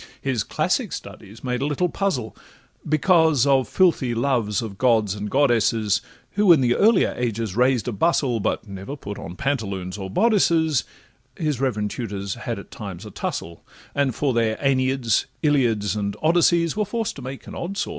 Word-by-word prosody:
His 130 Hz, -6 st, -1 dB
classic -, -, -1 dB
studies 105 Hz, +4 st, -9 dB
made 125 Hz, -1 st, -2 dB
a 140 Hz, -, 0 dB
little 150 Hz, +5 st, 0 dB
puzzle, 165 Hz, -, -2 dB, 0.5 s
Because 160 Hz, -3 st, +4 dB
of 135 Hz, -2 st, +3 dB
filthy 155 Hz, -10 st, +2 dB
loves 120 Hz, -3 st, 0 dB
of 100 Hz, -4 st, -7 dB
gods 110 Hz, -6 st, +3 dB
and 105 Hz, 0 st, -5 dB
goddesses, 115 Hz, -6 st, +2 dB, 0.3 s
Who 205 Hz, -2 st, +4 dB
in 165 Hz, -, +7 dB
the 120 Hz, -2 st, +3 dB
earlier 215 Hz, -1 st, +4 dB
ages 115 Hz, -4 st, -2 dB
raised 125 Hz, 0 st, +2 dB
a -, -, 0 dB
bustle, 125 Hz, -, +1 dB
But 110 Hz, -, -2 dB
never 100 Hz, +7 st, -7 dB
put 100 Hz, -8 st, -7 dB
on 85 Hz, -, -8 dB
pantaloons 100 Hz, -9 st, -3 dB
or 95 Hz, -1 st, -5 dB
bodices; 165 Hz, -, +2 dB, 0.5 s
His 150 Hz, -6 st, -1 dB
reverend 105 Hz, -6 st, -1 dB
tutors 100 Hz, -5 st, -4 dB
had -, -, -5 dB
at -, -, -11 dB
times 100 Hz, -1 st, -8 dB
a 105 Hz, -, -9 dB
tussle, 85 Hz, -2 st, -5 dB, 0.3 s
And 140 Hz, -4 st, 0 dB
for 140 Hz, -3 st, 0 dB
their 115 Hz, -2 st, +1 dB
AEneids, 130 Hz, -4 st, +1 dB, 0.2 s
Iliads, 115 Hz, -, +2 dB
and 100 Hz, -1 st, -3 dB
Odysseys, 170 Hz, 0 st, +3 dB
Were 210 Hz, -, +1 dB
forced 225 Hz, +2 st, -3 dB
to -, -, -8 dB
make 130 Hz, +1 st, -7 dB
an -, -, -9 dB
odd 195 Hz, +3 st, -5 dB
sort! 205 Hz, -, -1 dB
125 Hz, 175 wpm, -23 LUFS, 105-150 Hz, 0.5 s, in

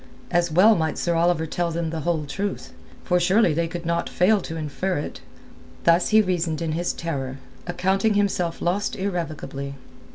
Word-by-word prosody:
As 175 Hz, -1 st, +2 dB
well 190 Hz, +8 st, +6 dB
might 160 Hz, -5 st, -1 dB
Sir 170 Hz, -, 0 dB
Oliver 170 Hz, -1 st, +2 dB
tell 170 Hz, +2 st, -1 dB
them 165 Hz, -1 st, -2 dB
the 165 Hz, -, -3 dB
whole 160 Hz, -1 st, -1 dB
truth, 195 Hz, +8 st, -4 dB, 0.3 s
for 180 Hz, 0 st, +2 dB
surely 185 Hz, 0 st, +3 dB
they 165 Hz, +2 st, 0 dB
could 170 Hz, 0 st, -6 dB
not 170 Hz, 0 st, -1 dB
fail 200 Hz, +3 st, +3 dB
to 165 Hz, -, -6 dB
infer 160 Hz, +4 st, -2 dB
it. 145 Hz, -, -5 dB, 0.6 s
Thus 170 Hz, +1 st, +4 dB
he 215 Hz, 0 st, +6 dB
reasoned 170 Hz, -4 st, -1 dB
in 165 Hz, -2 st, -2 dB
his 175 Hz, +3 st, -1 dB
terror, 135 Hz, -5 st, -4 dB, 0.3 s
accounting 190 Hz, +4 st, +1 dB
himself 185 Hz, -4 st, 0 dB
lost 195 Hz, +4 st, 0 dB
irrevocably. 155 Hz, -7 st, -4 dB
170 Hz, 170 wpm, -24 LUFS, 160-185 Hz, 0.6 s, well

